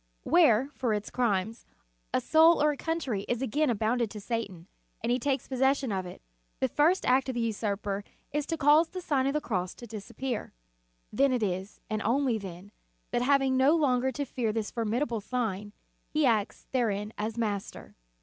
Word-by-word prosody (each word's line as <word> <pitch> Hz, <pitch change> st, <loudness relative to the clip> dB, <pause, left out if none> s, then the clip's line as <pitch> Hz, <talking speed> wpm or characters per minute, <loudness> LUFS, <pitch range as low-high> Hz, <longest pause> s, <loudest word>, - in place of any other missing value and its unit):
When, 275 Hz, -5 st, +4 dB
for 245 Hz, -6 st, -1 dB
its 210 Hz, 0 st, -5 dB
crimes, 220 Hz, -2 st, -1 dB, 0.4 s
a -, -, +2 dB
soul 320 Hz, -, +5 dB
or 300 Hz, 0 st, +4 dB
a -, -, -4 dB
country 280 Hz, -10 st, -2 dB
is 245 Hz, +1 st, 0 dB
again 290 Hz, +4 st, +1 dB
abandoned 230 Hz, +1 st, +1 dB
to 210 Hz, -, -8 dB
Satan, 200 Hz, -6 st, -4 dB, 0.4 s
and 230 Hz, -, 0 dB
he 250 Hz, -, +2 dB
takes 270 Hz, 0 st, -1 dB
possession 265 Hz, -1 st, +1 dB
of 190 Hz, -2 st, -2 dB
it, 180 Hz, -, -11 dB, 0.4 s
the -, -, +2 dB
first 330 Hz, +6 st, +2 dB
act 260 Hz, +1 st, +3 dB
of 260 Hz, -, -3 dB
the 240 Hz, -, 0 dB
usurper 205 Hz, -2 st, -2 dB, 0.3 s
is 295 Hz, 0 st, -1 dB
to 330 Hz, -, -2 dB
cause 305 Hz, +3 st, +5 dB
the 370 Hz, -, -6 dB
Sign 275 Hz, -6 st, +1 dB
of 275 Hz, -, 0 dB
the 300 Hz, -, +1 dB
Cross 185 Hz, -8 st, -2 dB
to 240 Hz, -, -10 dB
disappear. 225 Hz, +2 st, -5 dB, 0.6 s
Then 275 Hz, +5 st, +3 dB
it 250 Hz, -3 st, 0 dB
is, 190 Hz, +1 st, -3 dB
and 215 Hz, -1 st, -2 dB
only 240 Hz, +1 st, +1 dB
then, 190 Hz, 0 st, -9 dB, 0.4 s
that -, -, +1 dB
having 270 Hz, 0 st, +3 dB
no 270 Hz, +5 st, +5 dB
longer 265 Hz, -4 st, +2 dB
to 285 Hz, +4 st, -2 dB
fear 240 Hz, -4 st, -2 dB
this 215 Hz, -1 st, -3 dB
formidable 230 Hz, +1 st, -1 dB
sign, 210 Hz, -3 st, -3 dB, 0.4 s
he 305 Hz, -1 st, +1 dB
acts 220 Hz, -5 st, 0 dB
therein 215 Hz, -4 st, -1 dB
as 215 Hz, +2 st, -3 dB
master. 205 Hz, -4 st, -3 dB
240 Hz, 185 wpm, -29 LUFS, 210-275 Hz, 0.6 s, soul